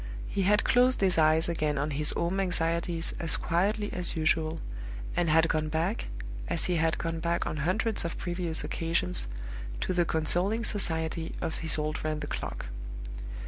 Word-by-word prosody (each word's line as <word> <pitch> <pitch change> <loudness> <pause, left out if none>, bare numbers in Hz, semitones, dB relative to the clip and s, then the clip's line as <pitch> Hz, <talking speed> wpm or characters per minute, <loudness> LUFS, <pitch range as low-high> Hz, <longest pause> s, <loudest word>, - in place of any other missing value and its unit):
He 200 - -2
had 210 +3 +3
closed 250 +1 +4
his 185 -4 +4
eyes 155 +1 +4
again 155 -3 -1
on 145 +2 -1
his 150 +2 +3
home 175 +3 -1
anxieties 170 -2 0
as 165 -2 +3
quietly 205 +5 0
as 180 -1 +2
usual, 160 0 +1 0.6
and 175 -2 +1
had 160 +2 +5
gone 155 -1 0
back, 155 - -1 0.4
as - - +1
he 180 -2 +1
had 165 0 +1
gone 165 -1 -3
back 170 +1 0
on 155 - -3
hundreds 205 +9 +1
of 170 - -4
previous 175 -2 -1
occasions, 90 - -1 0.5
to - - -1
the 175 -1 +3
consoling 175 +8 +1
society 160 -6 +1
of 160 - -3
his 160 -1 +1
old 155 0 -2
friend 155 -1 -2
the - - -3
clock. - - -5
165 Hz, 170 wpm, -29 LUFS, 155-180 Hz, 0.6 s, had